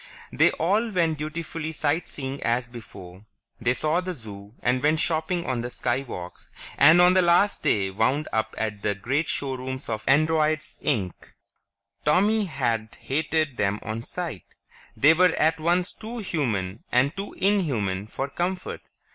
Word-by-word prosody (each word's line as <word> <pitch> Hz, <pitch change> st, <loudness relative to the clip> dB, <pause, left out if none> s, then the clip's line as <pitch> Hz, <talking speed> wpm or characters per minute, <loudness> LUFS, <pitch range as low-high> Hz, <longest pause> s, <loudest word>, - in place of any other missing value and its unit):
They -, -, +4 dB
all 205 Hz, +8 st, +1 dB
went 165 Hz, -6 st, +1 dB
dutifully 160 Hz, +1 st, -4 dB
sight 155 Hz, +2 st, -1 dB
seeing 135 Hz, 0 st, -6 dB
as 120 Hz, +1 st, 0 dB
before; 95 Hz, -5 st, -11 dB, 0.4 s
they 125 Hz, +2 st, +1 dB
saw 155 Hz, +5 st, +1 dB
the 185 Hz, -1 st, -4 dB
Zoo, 105 Hz, -3 st, -9 dB
and 125 Hz, +1 st, +2 dB
went 155 Hz, +2 st, +2 dB
shopping 165 Hz, +2 st, 0 dB
on 125 Hz, -2 st, -1 dB
the 120 Hz, -, -4 dB
Skywalks, 120 Hz, -8 st, -4 dB, 0.2 s
and 155 Hz, +5 st, +7 dB
on 180 Hz, +1 st, +7 dB
the 185 Hz, -, +5 dB
last 175 Hz, +4 st, +3 dB
day 95 Hz, -2 st, +1 dB
wound 130 Hz, +10 st, +1 dB
up 110 Hz, 0 st, -1 dB
at 105 Hz, -2 st, -3 dB
the 105 Hz, 0 st, 0 dB
great 135 Hz, +11 st, -1 dB
showrooms 130 Hz, -2 st, -4 dB
of 110 Hz, -1 st, -3 dB
"Androids, 155 Hz, +1 st, +2 dB
Inc." 95 Hz, -5 st, -2 dB, 0.7 s
Tommy 205 Hz, +8 st, +3 dB
had 115 Hz, -, -2 dB
hated 155 Hz, -1 st, -1 dB
them 105 Hz, +1 st, 0 dB
on 110 Hz, +1 st, -4 dB
sight; 160 Hz, -, -6 dB, 0.4 s
they 145 Hz, +3 st, +6 dB
were 180 Hz, 0 st, +4 dB
at 160 Hz, +1 st, +2 dB
once 175 Hz, +4 st, +1 dB
too 230 Hz, +3 st, -8 dB
human 115 Hz, -, -2 dB
and 130 Hz, +5 st, +2 dB
too 195 Hz, +1 st, -5 dB
inhuman 120 Hz, -, 0 dB
for 135 Hz, +5 st, -3 dB
comfort. 180 Hz, +5 st, -3 dB
145 Hz, 155 wpm, -25 LUFS, 115-170 Hz, 0.7 s, and